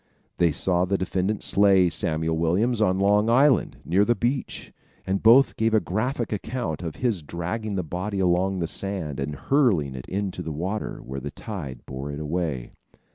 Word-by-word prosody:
They 85 -2 +4
saw 90 +3 +2
the 100 +1 0
defendant 95 +3 -1
slay 95 -2 +4
Samuel 80 -2 -1
Williams 100 +9 +1
on 95 -3 +3
Long 105 +3 +3
Island, 130 +2 +3
near 95 +5 +3
the 120 +3 +2
beach, 125 +3 -3 0.3
and 95 +1 -1
both 120 +5 +6
gave 110 0 +2
a - - +6
graphic 115 +5 -2
account 105 - -3
of 85 -3 -5
his 115 -8 -1
dragging 95 +7 -4
the 95 - -1
body 95 +5 -4
along 95 +1 +2
the 85 -2 -1
sand 85 -7 -4
and 75 +2 -3
hurling 95 - +2
it 65 -1 -8
into 100 -1 -3
the 80 - -5
water, 95 +8 -4
where 65 +1 -5
the 70 +2 -5
tide 70 - -7
bore 70 +2 -6
it 70 - -6
away. 75 -5 -3
95 Hz, 180 wpm, -25 LUFS, 80-110 Hz, 0.3 s, both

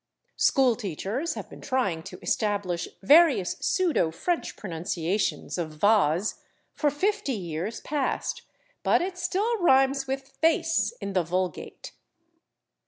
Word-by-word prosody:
School 260 -4 +4
teachers 215 - -3
have - - -6
been - - -13
trying 200 -11 -1
to 180 - -9
establish 200 -5 -1 0.2
various 280 - +5
pseudo 340 - +2
French 335 - -2
pronunciations 175 +1 -2
of 160 -3 -3
/vase/ 195 0 +2 0.3
for 295 - +1
fifty 380 +1 -1
years 175 +3 -4
past, 290 -3 -2 0.4
but - - +3
it 370 0 -4
still 395 +6 -1
rhymes 270 -3 +4
with 270 0 -6
/face/ 325 0 +2
in 200 - -4
the 185 - +3
vulgate. 180 +2 -4
230 Hz, 120 wpm, -26 LUFS, 180-305 Hz, 0.4 s, various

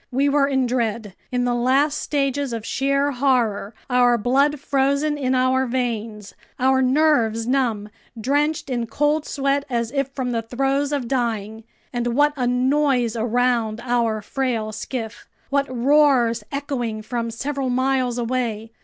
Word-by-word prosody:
We 275 +3 +1
were 280 -1 +3
in 265 -2 +1
dread, 230 -4 -2 0.2
in 250 0 0
the 245 - +1
last 270 +5 +2
stages 280 -2 -1
of 225 -1 -5
sheer 275 +3 0
horror, 240 -6 0
our 245 -1 +3
blood 275 +6 +2
frozen 280 +2 +1
in 260 -3 0
our 255 +1 +2
veins, 225 -4 -3 0.3
our 265 +1 +3
nerves 255 -5 +2
numb, 240 -5 0 0.3
drenched 290 +4 0
in 240 -2 -1
cold 295 +5 0
sweat 275 0 0
as 235 -2 -1
if 275 -1 0
from 260 -2 -3
the 230 -1 -1
throes 270 +5 -1
of 280 -5 -2
dying! 225 -4 -2 0.3
And 240 -1 -1
what 295 +1 +3
a 250 -3 -1
noise 255 -1 +1
around 230 -1 0
our 235 -3 0
frail 235 -4 -2
skiff! 220 0 -6 0.2
What 280 0 +1
roars 255 -3 +3
echoing 245 -6 -3
from 230 +1 -3
several 270 +3 -3
miles 255 -1 0
away! 230 -2 -2
255 Hz, 145 wpm, -22 LUFS, 230-275 Hz, 0.3 s, were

